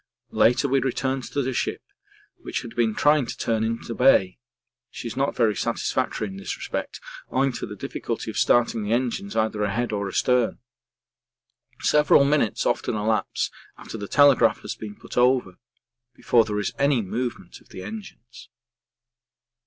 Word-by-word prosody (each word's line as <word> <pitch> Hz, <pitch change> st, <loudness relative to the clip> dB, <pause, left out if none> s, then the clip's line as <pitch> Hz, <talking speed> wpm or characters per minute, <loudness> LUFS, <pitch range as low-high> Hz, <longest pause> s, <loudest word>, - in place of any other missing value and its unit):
Later 120 Hz, +4 st, +3 dB
we 135 Hz, 0 st, +2 dB
returned 130 Hz, 0 st, -1 dB
to 140 Hz, -, -2 dB
the 130 Hz, +1 st, -2 dB
ship, -, -, -2 dB, 0.5 s
which -, -, -5 dB
had 115 Hz, -, -10 dB
been 115 Hz, -3 st, +1 dB
trying 145 Hz, -3 st, +3 dB
to -, -, -6 dB
turn 110 Hz, -1 st, 0 dB
in 115 Hz, +1 st, -1 dB
the 115 Hz, -, -5 dB
bay 115 Hz, -8 st, +3 dB, 0.5 s
she -, -, -7 dB
is 115 Hz, -, -6 dB
not 135 Hz, +2 st, 0 dB
very 110 Hz, -3 st, +2 dB
satisfactory 105 Hz, -, -1 dB
in 95 Hz, -1 st, -8 dB
this 95 Hz, -, -5 dB
respect -, -, -5 dB, 0.3 s
owing 135 Hz, +1 st, +1 dB
to 120 Hz, -, -5 dB
the 105 Hz, -, -8 dB
difficulty -, -, -4 dB
of -, -, -8 dB
starting 120 Hz, -2 st, +3 dB
the 105 Hz, +2 st, -1 dB
engines 130 Hz, +12 st, -2 dB
either 110 Hz, -1 st, 0 dB
ahead 105 Hz, +4 st, -1 dB
or 100 Hz, -1 st, -2 dB
astern 125 Hz, +4 st, +1 dB, 1.2 s
several 150 Hz, -2 st, +5 dB
minutes 140 Hz, -6 st, +1 dB
often -, -, 0 dB
elapse 110 Hz, +1 st, -1 dB, 0.3 s
after -, -, -9 dB
the 100 Hz, -2 st, -5 dB
telegraph 140 Hz, -4 st, +4 dB
has -, -, -5 dB
been 105 Hz, -1 st, -8 dB
put -, -, -11 dB
over 125 Hz, -7 st, +2 dB, 0.6 s
before 115 Hz, -2 st, +3 dB
there 105 Hz, -1 st, -3 dB
is 100 Hz, -, -2 dB
any 140 Hz, -5 st, +2 dB
movement 120 Hz, +5 st, -5 dB
of -, -, -25 dB
the 95 Hz, -, -9 dB
engines. 190 Hz, -, -10 dB
120 Hz, 165 wpm, -24 LUFS, 110-130 Hz, 1.2 s, several